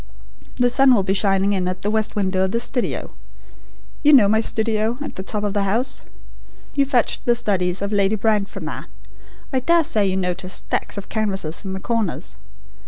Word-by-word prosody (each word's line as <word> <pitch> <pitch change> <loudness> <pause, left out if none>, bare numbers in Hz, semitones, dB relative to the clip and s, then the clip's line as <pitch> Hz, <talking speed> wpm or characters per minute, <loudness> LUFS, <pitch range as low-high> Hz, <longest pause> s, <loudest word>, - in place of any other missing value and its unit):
The 245 -1 +2
sun 265 0 +5
will 200 - +2
be 190 0 0
shining 195 0 +2
in 185 -2 -1
at 185 0 -4
the 205 - 0
west 220 -1 0
window 190 -2 +1
of - - -2
the 230 - 0
studio. 245 +1 -2 0.9
You 300 0 +5
know 235 -8 +7
my 220 +2 +3
studio 220 +1 0
at 295 - -6
the - - -5
top 205 +2 -3
of 205 -1 -1
the 205 - +1
house? 230 +7 0 0.7
You 280 -1 +2
fetched 250 -4 0
the 240 - +3
studies 190 -4 0
of 200 - -3
Lady 200 0 +2
Brand 210 -1 +1
from - - -8
there. - - -6 0.7
I 260 - +2
dare 335 +5 +3
say 215 -10 +1
you 190 0 0
noticed 185 0 -1
stacks - - -3
of 200 - -6
canvases 195 -7 -2
in 190 - -4
the 190 - -4
corners. 220 - -2
210 Hz, 200 wpm, -21 LUFS, 190-235 Hz, 0.9 s, know